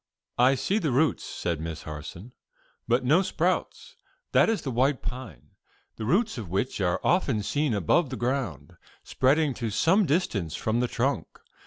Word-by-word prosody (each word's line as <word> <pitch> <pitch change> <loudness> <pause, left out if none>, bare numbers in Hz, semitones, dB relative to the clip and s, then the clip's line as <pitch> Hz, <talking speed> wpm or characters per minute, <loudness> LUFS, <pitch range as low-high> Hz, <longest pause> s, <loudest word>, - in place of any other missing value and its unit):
"I 130 +2 +5
see 200 +10 0
the 160 - -1
roots," 140 +5 +1
said 85 -3 -3
Miss 80 -1 -6
Harson, 80 +8 -8 0.6
"but 120 +2 +2
no 155 +8 +5
sprouts. 180 -1 -2 0.3
That - - +4
is 225 - -1
the 135 - -3
white 130 +3 +1
pine, 115 - -7 0.5
the 110 - -4
roots 200 - +1
of 105 -6 -7
which 100 +4 -2
are 90 -2 +1
often 140 - +1
seen 145 0 0
above 125 - +2
the 130 - -5
ground, 120 - -3 0.3
spreading 140 +2 +2
to 115 -2 -3
some 170 - +3
distance 105 - 0
from 110 +2 -1
the 125 - +1
trunk. 135 +4 -1
125 Hz, 165 wpm, -27 LUFS, 100-150 Hz, 0.6 s, I